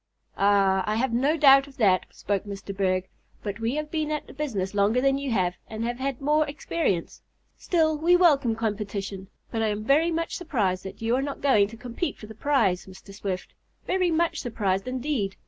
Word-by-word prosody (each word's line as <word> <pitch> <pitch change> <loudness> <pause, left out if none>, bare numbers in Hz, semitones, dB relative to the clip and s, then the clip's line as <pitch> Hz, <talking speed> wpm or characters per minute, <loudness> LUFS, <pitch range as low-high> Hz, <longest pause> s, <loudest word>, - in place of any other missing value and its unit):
"Ah, 195 -1 +3
I 215 - +1
have 230 +1 0
no 280 +7 +2
doubt 275 -2 +7
of 270 - -16
that," 190 -5 +3
spoke 200 0 -3
Mr. 200 -1 -7
Berg, 185 -1 0 0.4
"but 205 0 -4
we 230 +4 -1
have 305 0 -3
been 310 -2 -1
at 300 -1 -2
the - - -13
business 220 -10 -3
longer 205 +4 +3
than 270 +1 +2
you 280 -1 -3
have, 185 -6 +1 0.2
and 220 +1 -4
have 240 +1 -3
had 270 -1 -2
more 300 +2 +3
experience. 285 - -2 0.3
Still 315 -3 +1
we 345 +3 +5
welcome 285 -10 +4
competition. 205 -3 -4 0.2
But 225 - -1
I 220 - +2
am 210 0 -2
very 295 +8 +3
much 330 0 -2
surprised 210 - -1
that 190 - -8
you 230 +2 +2
are 260 - +1
not 280 0 -4
going 220 -8 +4
to 230 +2 -11
compete 245 +7 -4
for - - -10
the 220 - -10
prize, 220 -8 +1
Mr. 190 +1 -13
Swift. 195 -2 -5 0.3
Very 365 -1 +1
much 335 +1 +1
surprised, 205 -4 -1
indeed! 255 -6 -2
230 Hz, 200 wpm, -26 LUFS, 200-285 Hz, 0.4 s, doubt